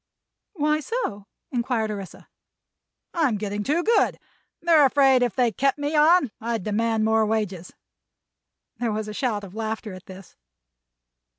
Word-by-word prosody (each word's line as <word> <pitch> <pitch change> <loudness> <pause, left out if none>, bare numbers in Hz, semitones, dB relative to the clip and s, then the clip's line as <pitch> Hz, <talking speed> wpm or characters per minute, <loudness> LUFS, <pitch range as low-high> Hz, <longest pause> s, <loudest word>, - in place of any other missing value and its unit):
"Why 305 -3 +1
so?" 295 - -4 0.2
inquired 235 -3 -1
Orissa. 200 -3 -8 0.9
"I'm 295 - +1
getting 205 0 -3
too 310 +9 0
good. 460 +4 +2 0.4
They're 330 -3 +5
afraid 270 -1 +4
if 245 -5 0
they 245 -2 +2
kept 275 +7 +1
me 290 +1 -2
on 305 -3 +5
I'd 230 -3 -2
demand 220 +1 0
more 220 0 +3
wages." 210 -5 -2 1.1
There 235 -2 -1
was 215 0 -3
a 210 - -6
shout 215 -3 -2
of 190 -2 -10
laughter 220 -1 -4
at 185 0 -12
this. 190 -1 -12
225 Hz, 140 wpm, -24 LUFS, 210-285 Hz, 1.1 s, They're